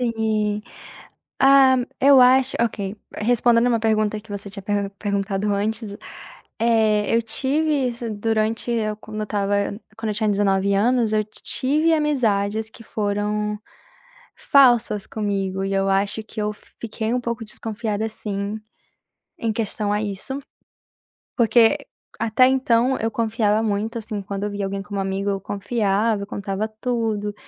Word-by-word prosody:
Sim, 220 -3 0 0.8
hã, 270 -2 +6
eu 275 -1 +7
acho, 260 +1 +5
ok, 205 -3 -2 0.2
respondendo 235 +1 +3
uma 235 -2 +2
pergunta 215 -1 +1
que 215 +1 -19
você 200 0 -6
tinha 200 0 -8
per 205 0 -1
perguntado 200 0 -1
antes, 210 +1 -2 0.6
eh, 220 -2 +2
eu 230 - +3
tive 280 +4 0
isso 235 -1 -5
durante 220 +2 -1
eu, 215 -2 -1
quando 215 0 -9
eu - - -1
estava, 205 -1 -1 0.4
quando 225 -1 -4
eu - - -2
tinha 215 0 0
19 200 -1 +2
anos, 230 +2 +2
eu 215 0 +2
tive 290 +9 0
amizades 220 -8 0
que 230 - -14
foram 210 0 -2 0.8
falsas 240 -7 +4
comigo 195 -3 -2
e 195 0 -2
eu 195 0 +1
acho 200 +3 0
que 220 0 -8
eu 210 0 -1
fiquei 220 +1 -6
um 250 - +1
pouco 235 -1 -4
desconfiada 220 0 -3
sim, 205 -1 -4 0.8
em 230 - -1
questão 215 -2 -2
a 210 0 +1
isso. 210 +6 -4 1.0
Porque 235 +2 +5 0.4
até 225 +3 +4
então 260 -1 +2
eu 225 - -1
confiava 220 -2 +1
muito, 220 +2 -1
assim, 215 -2 -5
quando 195 +1 -4
eu 210 - -2
via 205 0 -3
alguém 195 0 -3
como 200 0 -4
amigo, 195 +1 -2
eu 195 -1 -2
confiava, 205 +1 0
eu - - -5
contava 200 +1 -3
tudo, 220 -2 -2
215 Hz, 145 wpm, -22 LUFS, 205-230 Hz, 1.0 s, eu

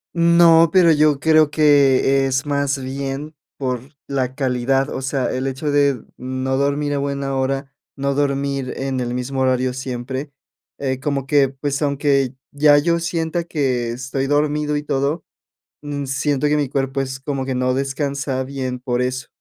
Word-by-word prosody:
No, 170 -1 +6
pero 175 -2 +5
yo 150 -2 +3
creo 155 0 +4
que 140 -3 +4
es 130 +1 -1
más 140 -1 0
bien 135 +3 -5 0.2
por 130 -2 -2 0.3
la 130 -2 -2
calidad, 135 0 0
o - - -4
sea, 135 -1 -1
el 130 +1 -2
hecho 135 +3 -2
de 140 -4 +2
no 130 +1 -2
dormir 145 +1 0
a 140 - 0
buena 140 -1 -2
hora, 135 +1 -2 0.2
no 140 0 -1
dormir 140 -2 -1
en 135 -1 -2
el 120 0 -2
mismo 130 +2 -3
horario 130 -1 +1
siempre, 130 +2 -5 0.5
eh, 130 -2 -2
como 140 -1 -2
que, 140 -1 +3
pues, 140 +2 -3
aunque 140 -2 +1 0.2
ya 145 0 +5
yo 170 +3 +2
sienta 170 0 -2
que 130 -7 -1
estoy 130 +3 -3
dormido 150 +1 +1
y 145 - -3
todo, 145 +3 -1 0.6
mm, 145 -1 -4
siento 140 +2 0
que 150 - +2
mi 145 -3 0
cuerpo 135 0 -1
es 135 0 -5
como 135 -1 -3
que 130 - -2
no 125 0 +1
descansa 140 0 -2
bien 130 -2 -4
por 125 -1 -1
eso. 130 0 -2
140 Hz, 165 wpm, -20 LUFS, 130-145 Hz, 0.6 s, No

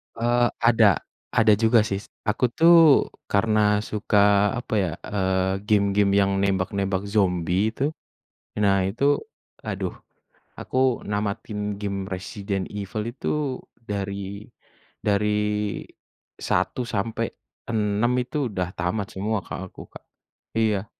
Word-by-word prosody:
Eee, 120 +1 +2
ada 115 -5 +4 0.3
ada 110 -2 +5
juga 115 0 +4
sih. 100 -2 -2 0.3
Aku 125 - +1
tuh 165 -3 +6 0.2
karena 105 0 +2
suka 105 -1 +2
apa 120 -2 -5
ya, 95 -5 +1
eee 95 -1 0
game-game 100 -2 +3
yang 100 -1 +3
nembak-nembak 95 0 -1
zombie 95 +1 +1
itu. 140 +4 0 0.7
Nah 100 -2 +3
itu, 140 +9 +2 0.5
aduh, - - -4 0.6
aku 130 -1 0
namatin 105 0 -3
game 100 -1 -4
Resident 95 0 -4
Evil 105 +2 -4
itu 140 +1 -2 0.2
dari 100 -2 -5 0.6
dari 105 0 0 0.6
1-6 110 -1 -2
itu 135 +3 -2
udah 90 -2 -2
tamat 95 +3 -2
semua, 105 +1 -1
Kak, - - -7
aku, - - -12
Kak. - - -13 0.5
Iya. 105 -2 +1
105 Hz, 105 wpm, -24 LUFS, 100-110 Hz, 0.7 s, tuh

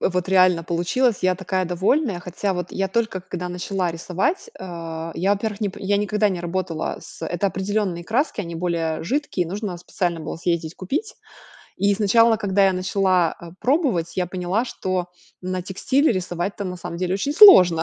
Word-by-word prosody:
Вот 180 0 0
реально 185 -3 +4
получилось. 180 +8 +1
Я 185 0 +3
такая 185 0 -2
довольная. 190 - +1
Хотя 180 +3 -2
вот 180 -1 -3
я 195 - -1
только 220 -2 -1
когда 180 -1 -5
начала 180 0 -2
рисовать, 180 - -2
э, 165 -2 -6
я, 195 +3 +1
во-первых, 205 +1 -3
нип 200 -3 -2
я 200 +1 +1
никогда 210 +1 +1
не 185 -3 -3
работала 175 -2 -3
с - - -9
Это 175 +3 -1
определённые 190 -2 -2
краски, 240 - 0
они 170 -4 -6
более 165 -2 -2
жидкие, 240 - -1
нужно 195 +1 -4
специально 175 -1 -2
было 155 - -5
съездить 170 -1 -2
купить. 310 - -3 0.6
И 200 0 +2
сначала, 225 +2 +4
когда 200 -2 +2
я 190 - +3
начала, 185 -1 +1
э, 170 - -10
пробовать, 250 - +1
я 180 - 0
поняла, 185 +5 -1
что 185 -6 -3 0.3
на 185 0 -3
текстиле 260 - +1
рисовать-то, 185 +1 -3
на 180 -1 -4
самом 170 -1 -7
деле, 180 +1 -1
очень 200 +9 -1
сложно. 185 - +8
185 Hz, 170 wpm, -22 LUFS, 175-205 Hz, 0.6 s, сложно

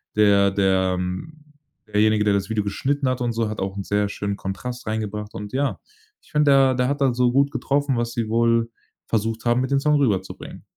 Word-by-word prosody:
der 100 -2 +4
der 95 -2 +1 0.9
derjenige, 105 0 +2
der 105 -1 +2
das 100 +1 -2
Video 110 -2 0
geschnitten 135 +8 -1
hat 130 - -1
und 120 -1 0
so, 115 -1 -1
hat 105 - -5
auch 95 0 -3
'n 100 - -3
sehr 105 +1 0
schönen 100 0 -3
Kontrast 120 +6 -6
reingebracht 105 -1 -4
und 105 +1 -7
ja. 140 +1 -1 0.4
Ich - - -24
finde, 150 -1 +3
der 135 -1 +5
der 125 0 +1
hat 140 +1 -2
da 135 -2 +3
so 125 0 +2
gut 140 +2 +2
getroffen, 140 -2 0
was 120 0 -2
sie 115 -2 -2
wohl 115 0 +2 0.4
versucht 110 +1 -2
haben, 120 +1 +2
mit 130 - -3
den 140 - +3
Song 150 +2 +2
rüberzubringen. 105 -10 -2
115 Hz, 205 wpm, -23 LUFS, 100-130 Hz, 0.9 s, der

